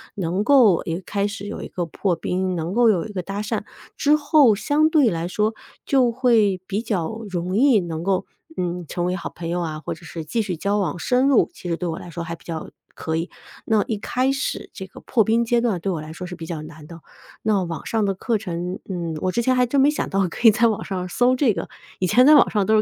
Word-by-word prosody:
能 185 0 -1
够 235 -8 +5
一 165 - -2
个 180 - -5
开 200 0 -1
始 205 -1 -7
有 205 - -6
一 - - -6
个 175 - -3
破 175 +2 -1
冰， 185 +2 -2
能 165 +2 -3
够 235 +1 +4
有 185 -6 +1
一 220 - -8
个 185 - -2
搭 195 +3 -4
讪， 210 - -2 0.3
之 295 +1 +3
后 290 -6 +4
相 295 +8 +2
对 295 -7 +4
来 165 0 -2
说 210 +4 0 0.3
就 255 -3 +3
会 225 -6 +2
比 200 +3 -2
较 220 -2 -2
容 180 0 -3
易 250 0 +5
能 165 -3 -4
够， 190 0 0 0.3
嗯， 175 -1 -3
成 175 +3 -2
为 180 +1 0
好 175 - -5
朋 170 -1 -7
友 175 +1 -1
啊， 155 -2 -4
或 - - -5
者 165 - -14
是 165 -1 -7
继 225 +9 -1
续 190 -5 -3
交 200 +5 0
往 175 -5 -1
深 250 +9 +2
入， 280 - +3
其 180 - -8
实 170 - -1
对 180 - -3
我 165 -1 -3
来 - - -10
说 170 0 -5
还 165 +1 -5
比 - - -22
较 165 -2 -6 0.3
可 160 - -3
以。 165 +3 -2 0.4
那 215 -2 +2
一 220 - -1
开 255 +5 0
始 275 +1 -3
这 190 - -7
个 - - -13
破 230 -4 +2
冰 230 +2 +2
阶 235 +1 +2
段 225 -7 0
对 190 +3 -2
我 165 -4 -3
来 155 +1 -9
说 180 +3 -7
是 180 - -7
比 165 -1 -8
较 160 -2 -5
难 155 -1 -11
的， 165 0 -11 0.4
那 210 -3 +2
网 170 -2 -6
上 225 -1 0
的 195 - 0
课 220 +4 -1
程， 180 -2 -4
嗯， 170 -3 -3
我 185 - 0
之 235 - 0
前 255 +2 +2
还 250 0 +3
真 275 +3 +1
没 275 +2 +5
想 300 - -2
到 195 -1 +1
可 230 - +2
以 - - +10
在 235 +2 +3
网 220 -3 -1
上 185 -2 -4
搜 245 +7 +2
这 255 -4 +2
个， - - -5 0.3
以 185 - +1
前 245 +7 +5
在 300 +2 +8
网 290 - +6
上 205 -3 +1
都 220 - +3
是 215 - +5
195 Hz, 285 characters per minute, -22 LUFS, 175-235 Hz, 0.4 s, 以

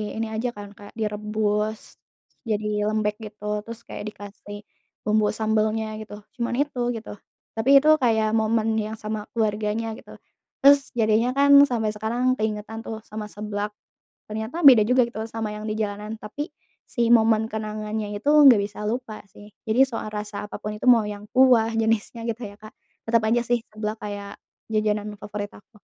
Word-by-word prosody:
ini 225 0 -2
aja 235 +3 -1
kan 205 -1 -9
kayak 205 +1 -14
direbus, 210 0 -2
terus - - -47
jadi 210 -1 -1
lembek 215 -1 0
gitu 210 -1 -10 0.2
terus 230 0 -8
kayak - - -7
dikasih 205 0 -10 0.4
bumbu 215 0 +2
sambalnya 220 0 0
gitu, 210 -1 -9 0.2
cuman 240 0 -1
itu 285 -4 -9 0.2
gitu. 225 - -7 0.4
Tapi 225 +4 -1
itu 310 - +4
kayak 220 -3 +2
momen 220 0 +1
yang 215 +1 -3
sama 215 -1 -5
keluarganya 215 +1 -1
gitu. - - -13 0.5
Terus 280 0 +6
jadinya 225 +3 +2
kan 280 0 +5 0.2
sampai 225 -3 -1
sekarang 235 +4 0
keingetan 215 +1 -3
tuh 220 -1 -6
sama 215 -1 -7
seblak, 210 0 -4 0.6
ternyata 220 +11 -4
beda 250 -6 +10
juga 250 0 +4
gitu 225 -2 -8
loh 225 - -5
sama 220 -1 -4
yang 210 0 -7
di 215 - -2
jalanan 210 +1 -3
tapi 280 - -6 0.4
si 235 -2 0
momen 220 -1 +4
kenangannya 215 -1 -4
itu 285 +8 -1
nggak 285 -7 +8
bisa 210 +1 -5
lupa 235 -2 -4
sih. 205 +1 -14 0.2
Jadi 220 +4 +3
soal 225 -3 -5
rasa 210 -1 -5
apa - - -6
pun 210 0 -4
itu, - - -7
mau 230 -3 +6
yang 205 0 -7
kuah 250 -4 +5
jenisnya 225 +1 0
gitu 230 +1 -4
ya 205 - -14
Kak, 215 +3 -13 0.4
tetep 230 -1 +4
aja 235 +2 +2
sih 240 0 +1
seblak 215 0 -3
kayak 205 -1 -6 0.3
jajanan 210 -1 0
favorit 205 0 -6
aku. 210 +1 -18
215 Hz, 170 wpm, -24 LUFS, 210-230 Hz, 0.6 s, beda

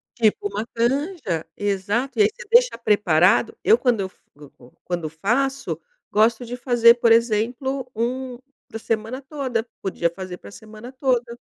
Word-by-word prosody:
Tipo 215 -3 +1
uma 205 +2 -4
canja, 240 - -1
exato. 205 - -1
E - - +7
aí 415 - +4
você 480 -3 -12
deixa 485 - +4
preparado 205 -3 +3
eu 225 - +6
quando 240 -4 +1
eu 190 - -2
f - - -31
go 145 -1 -14
go 120 0 -18
quando 175 -2 -3
eu 155 - -3
faço, 240 - -1 0.3
gosto 225 +3 +2
de 245 - -5
fazer, 240 -2 +5
por 235 -1 +2
exemplo, 245 +4 +1
um 250 +2 -3 0.3
pra 225 - -7
semana 225 +4 -3
toda, 260 -5 -3
podia 175 -3 -1
fazer 185 0 -8
pra - - -13
semana 220 +3 -11
toda. 245 -3 -1
230 Hz, 165 wpm, -22 LUFS, 205-255 Hz, 0.3 s, E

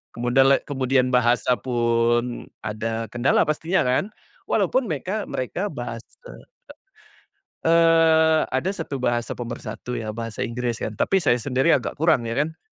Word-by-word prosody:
kemudala 135 +3 +3
kemudian 130 -2 0
bahasa 125 0 +2
pun 120 -1 0 0.2
ada 115 +1 -4
kendala 120 +2 +2
pastinya 160 +5 0
kan, 125 +10 +1 0.4
walaupun - - +1
meka - - -3
mereka - - -3
bahas - - -6 1.6
eee, 165 -1 +4
ada 130 +9 0
satu 140 -8 -5
bahasa 120 -1 -1
pemersatu 120 +1 -6
ya 110 - -6
bahasa 115 +1 -6
Inggris 120 -1 -3
kan 110 - -4
tapi 195 -1 +2
saya 125 -4 +3
sendiri 130 +5 +1
agak 105 -5 -5
kurang 155 -7 +2
ya 115 - -3
kan, 150 +4 -2
125 Hz, 130 wpm, -23 LUFS, 120-155 Hz, 1.6 s, eee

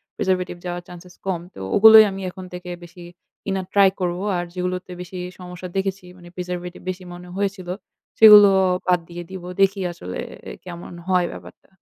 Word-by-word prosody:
preservative 180 -2 -1
যাওয়ার 175 0 -4
chances 180 0 -13
কম। 185 -3 -1
তো - - -12 0.2
ওগুলোই 220 +1 +10
আমি 195 0 -6
এখন 185 0 -9
থেকে 180 0 -8
বেশি 175 +1 -13 0.4
কিনার 195 -2 -2
ট্রাই 200 -1 +6
করব। 175 -1 -1 0.2
আর 175 - -1
যেগুলোতে 180 0 -3
বেশি 180 +1 -8 0.2
সমস্যা 180 0 -8
দেখেছি, 195 -1 -2
মানে 175 -1 -14
preservative 180 0 -6
বেশি 185 0 -5
মনে 175 0 -11
হয়েছিল, 195 -2 -2 0.5
সেগুলো 210 -2 +10 0.4
বাদ 180 -1 +3
দিয়ে 175 0 -7
দিবো। 185 -2 -7
দেখি 195 +1 +3
আসলে 90 - -7 0.3
অ্যা - - -7
কেমন 175 -1 -9 0.2
হয় 180 -1 +3
ব্যাপারটা? - - -13
180 Hz, 165 wpm, -22 LUFS, 175-190 Hz, 0.5 s, ওগুলোই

